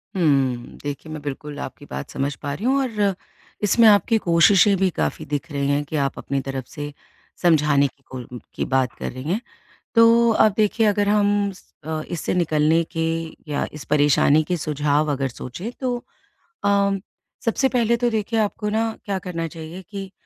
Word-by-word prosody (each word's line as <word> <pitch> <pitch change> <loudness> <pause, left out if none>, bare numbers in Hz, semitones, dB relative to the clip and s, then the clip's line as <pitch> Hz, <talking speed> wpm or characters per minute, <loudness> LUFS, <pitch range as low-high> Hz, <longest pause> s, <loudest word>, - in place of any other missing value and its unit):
हुँ। 135 -8 +1
देखिए, 145 +2 -5
मैं 155 - -6
बिल्कुल 145 +1 -6
आपकी 145 - -7
बात - - -6
समझ 140 +1 -2
पा 145 -1 -5
रही 195 +10 -5
हूँ 265 +2 +3
और 210 -6 0 0.5
इसमें 220 +3 +5
आपकी 215 +2 +5
कोशिशें 185 +4 +5
भी 190 0 +2
काफ़ी 155 - -1
दिख 150 +3 -4
रही 140 -1 -1
हैं 145 +1 +1
कि 155 - -6
आप - - -9
अपनी 140 0 -2
तरफ 135 -1 -5
से 145 -1 -7 0.5
समझाने 150 -4 +4
की 135 +1 -19
कोल्म 125 -1 -7 0.2
की - - -1
बात 130 -2 +2
कर - - -3
रही 130 +1 -8
हैं। 185 +9 -1 0.5
तो 230 +1 +6
अब 215 - +5
देखिए, 215 +1 +3
अगर 205 0 +2
हम 205 -1 +2
स 190 - -15 0.2
अ, 155 0 -3
इससे 170 0 -2
निकलने 160 -1 +2
के 165 - -3 0.5
या 145 - 0
इस 150 - -8
परेशानी 145 +1 +4
के 180 - 0
सुझाव 150 0 0
अगर 135 -1 -1
सोचें, 130 - -7
तो 250 -2 -1 0.7
अ, 200 0 +3 0.5
सबसे 265 +4 +2
पहले 235 -2 +2
तो 240 0 +1
देखिए, 220 +1 -1
आपको 210 0 -1
ना 225 +1 0
क्या 200 -2 -1
करना 165 -3 -4
चाहिए 165 +3 -8
कि 195 -2 -6
165 Hz, 180 wpm, -22 LUFS, 145-205 Hz, 0.7 s, तो